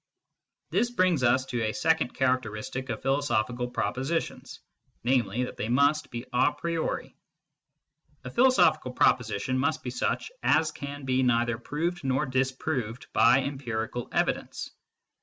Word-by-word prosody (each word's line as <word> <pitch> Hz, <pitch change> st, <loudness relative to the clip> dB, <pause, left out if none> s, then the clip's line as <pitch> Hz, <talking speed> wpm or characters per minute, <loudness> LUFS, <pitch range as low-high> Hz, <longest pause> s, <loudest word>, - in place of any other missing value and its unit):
This 240 Hz, -, +2 dB
brings 185 Hz, -, +2 dB
us 125 Hz, +1 st, +3 dB
to 120 Hz, -2 st, -3 dB
a 110 Hz, -1 st, 0 dB
second 160 Hz, -5 st, +1 dB
charateristic 130 Hz, 0 st, -1 dB
of 115 Hz, -, -4 dB
philo 135 Hz, +1 st, +2 dB
sophical 125 Hz, -2 st, -1 dB
propositions, 135 Hz, +6 st, -3 dB, 0.4 s
namely, 125 Hz, -2 st, +1 dB
that 125 Hz, -, -6 dB
they 110 Hz, -, -3 dB
must 140 Hz, +4 st, +3 dB
be 120 Hz, 0 st, -6 dB
a 125 Hz, +4 st, +4 dB
priori. 170 Hz, -1 st, -3 dB, 1.1 s
A -, -, -7 dB
philosophical 235 Hz, -, +4 dB
proposition 125 Hz, +1 st, +1 dB
must 155 Hz, +4 st, 0 dB
be 125 Hz, -, -4 dB
such 125 Hz, -, -2 dB
as 155 Hz, -1 st, +3 dB
can 140 Hz, -1 st, -7 dB
be 130 Hz, 0 st, +2 dB
neither 120 Hz, -2 st, +2 dB
proved 170 Hz, +7 st, -3 dB
nor 135 Hz, +2 st, +1 dB
disproved 130 Hz, -2 st, -2 dB
by 130 Hz, +2 st, +5 dB
empirical 120 Hz, -4 st, -4 dB
evidence. -, -, -1 dB
130 Hz, 135 wpm, -28 LUFS, 120-145 Hz, 1.1 s, by